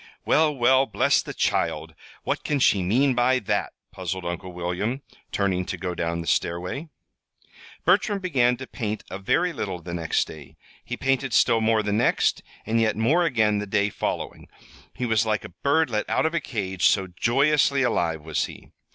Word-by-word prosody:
"Well, 155 Hz, -1 st, +3 dB
well, 130 Hz, +2 st, +4 dB
bless -, -, +2 dB
the -, -, -7 dB
child! -, -, -1 dB, 0.3 s
What -, -, -2 dB
can 150 Hz, -, 0 dB
she 105 Hz, -7 st, +3 dB
mean 125 Hz, +9 st, +2 dB
by 125 Hz, +1 st, +3 dB
that?" 105 Hz, -4 st, -1 dB, 0.2 s
puzzled 95 Hz, 0 st, -5 dB
Uncle 85 Hz, +1 st, -5 dB
William, 90 Hz, +9 st, -3 dB, 0.3 s
turning 95 Hz, -2 st, 0 dB
to 90 Hz, -, -4 dB
go 90 Hz, +1 st, -3 dB
down 85 Hz, -1 st, -2 dB
the -, -, -7 dB
stairway. 90 Hz, -, -2 dB, 1.0 s
Bertram 200 Hz, +4 st, +3 dB
began 130 Hz, -10 st, +1 dB
to 130 Hz, -, -7 dB
paint 110 Hz, -5 st, -4 dB
a 95 Hz, -, -5 dB
very 175 Hz, -, +1 dB
little 95 Hz, -, -4 dB
the 85 Hz, 0 st, -8 dB
next 85 Hz, -2 st, 0 dB
day. 75 Hz, -4 st, -12 dB, 0.3 s
He -, -, -5 dB
painted 135 Hz, -2 st, 0 dB
still 115 Hz, +2 st, +4 dB
more 110 Hz, -1 st, +2 dB
the 105 Hz, -1 st, -1 dB
next, 110 Hz, +4 st, +2 dB, 0.2 s
and 115 Hz, +1 st, +1 dB
yet 110 Hz, -1 st, +2 dB
more 150 Hz, +11 st, +3 dB
again 110 Hz, -8 st, +2 dB
the 105 Hz, -, -4 dB
day 100 Hz, 0 st, +1 dB
following. -, -, -4 dB, 0.5 s
He 125 Hz, -, -2 dB
was 110 Hz, -2 st, +1 dB
like 105 Hz, -3 st, -1 dB
a -, -, -8 dB
bird 140 Hz, -, +1 dB
let 105 Hz, -1 st, -2 dB
out -, -, +1 dB
of 160 Hz, -, 0 dB
a 170 Hz, -, +1 dB
cage, 95 Hz, -7 st, 0 dB
so 95 Hz, -2 st, +2 dB
joyously 135 Hz, +8 st, +2 dB
alive 80 Hz, -10 st, 0 dB
was 80 Hz, -2 st, -1 dB
he. -, -, -12 dB
110 Hz, 185 wpm, -24 LUFS, 95-135 Hz, 1.0 s, well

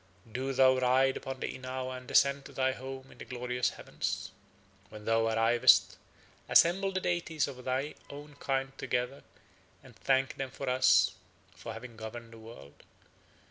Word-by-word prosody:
Do 130 Hz, +3 st, -2 dB
thou 130 Hz, -1 st, +5 dB
ride 130 Hz, +1 st, +3 dB
upon 135 Hz, -1 st, -6 dB
the -, -, -3 dB
inao 130 Hz, 0 st, -4 dB
and 125 Hz, -1 st, -10 dB
ascend 140 Hz, 0 st, +3 dB
to -, -, -11 dB
thy 130 Hz, 0 st, +1 dB
home 130 Hz, 0 st, -8 dB
in -, -, -17 dB
the -, -, -6 dB
glorious 125 Hz, 0 st, -1 dB
heavens. -, -, -4 dB, 0.6 s
When 105 Hz, 0 st, -11 dB
thou 115 Hz, 0 st, +2 dB
arrivest, 115 Hz, +1 st, +4 dB, 0.5 s
assemble 195 Hz, +3 st, +5 dB
the 190 Hz, -, -1 dB
deities 170 Hz, -4 st, -1 dB
of 130 Hz, -3 st, -9 dB
thy 130 Hz, +3 st, -1 dB, 0.2 s
own 145 Hz, +1 st, -10 dB
kind 135 Hz, 0 st, -2 dB
together 125 Hz, +3 st, -2 dB, 0.6 s
and -, -, -16 dB
thank 135 Hz, 0 st, +1 dB
them 135 Hz, -1 st, -3 dB
for 135 Hz, +1 st, -7 dB
us 130 Hz, 0 st, +4 dB, 0.4 s
for 115 Hz, -, -7 dB
having 115 Hz, 0 st, -10 dB
governed 115 Hz, +1 st, -8 dB
the 115 Hz, -, -12 dB
world. 110 Hz, -11 st, -13 dB
130 Hz, 160 wpm, -31 LUFS, 120-135 Hz, 0.6 s, thou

